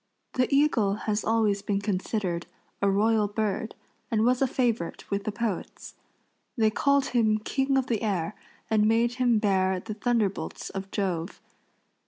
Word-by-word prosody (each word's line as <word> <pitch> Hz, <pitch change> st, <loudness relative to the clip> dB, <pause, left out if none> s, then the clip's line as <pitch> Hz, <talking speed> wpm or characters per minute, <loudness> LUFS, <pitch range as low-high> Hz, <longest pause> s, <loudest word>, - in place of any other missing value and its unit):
The 255 Hz, -1 st, +2 dB
eagle 275 Hz, -9 st, +3 dB
has 215 Hz, 0 st, 0 dB
always 215 Hz, -3 st, +2 dB
been 200 Hz, -1 st, -1 dB
considered 190 Hz, -3 st, -2 dB, 0.3 s
a 200 Hz, -, +3 dB
royal 210 Hz, +2 st, +3 dB
bird, 215 Hz, +1 st, -2 dB, 0.3 s
and 220 Hz, -1 st, +1 dB
was 250 Hz, +1 st, +2 dB
a 270 Hz, -, +4 dB
favorite 235 Hz, -8 st, -1 dB
with 200 Hz, 0 st, -1 dB
the 215 Hz, -, -1 dB
poets. 210 Hz, -3 st, -4 dB, 0.6 s
They 220 Hz, -2 st, +3 dB
called 280 Hz, +4 st, +2 dB
him 220 Hz, -3 st, +3 dB
king 270 Hz, +5 st, 0 dB
of 265 Hz, -, +1 dB
the 230 Hz, -5 st, -1 dB
air 195 Hz, -4 st, -1 dB, 0.3 s
and 215 Hz, -1 st, +3 dB
made 230 Hz, +2 st, +2 dB
him 240 Hz, -3 st, +4 dB
bear 190 Hz, -3 st, +2 dB
the 215 Hz, +3 st, -6 dB
thunderbolts 215 Hz, -2 st, -1 dB
of 195 Hz, 0 st, -6 dB
Jove. 185 Hz, -3 st, -2 dB
215 Hz, 155 wpm, -27 LUFS, 200-235 Hz, 0.6 s, a